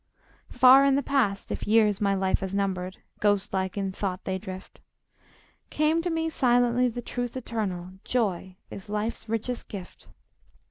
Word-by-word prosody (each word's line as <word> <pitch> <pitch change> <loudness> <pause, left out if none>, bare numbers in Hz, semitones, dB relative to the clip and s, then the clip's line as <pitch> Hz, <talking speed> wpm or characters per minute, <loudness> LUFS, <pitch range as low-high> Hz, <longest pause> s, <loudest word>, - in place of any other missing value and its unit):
Far 260 +2 +7
in 275 -1 +4
the 280 - +1
past 245 -9 0
(if - - -4
years 210 -2 +3
my 200 -1 +2
life 190 0 +1
has 190 0 -4
numbered, 185 -2 -2 0.2
Ghost 205 -1 +1
like 190 0 -2
in 195 -1 -1
thought 190 -1 -4
they 190 0 -2
drift), 185 -1 -9 0.9
Came 310 +2 +2
to 350 - -2
me 325 -1 -1
silently 245 -4 +2
the 240 0 -5
truth 245 +1 -4
eternal 195 -7 -4
Joy 190 -6 -1 0.2
is 195 +1 -9
life's 215 +1 -3
richest 225 +2 -3
gift. 195 -3 -9
210 Hz, 155 wpm, -27 LUFS, 190-245 Hz, 0.9 s, Far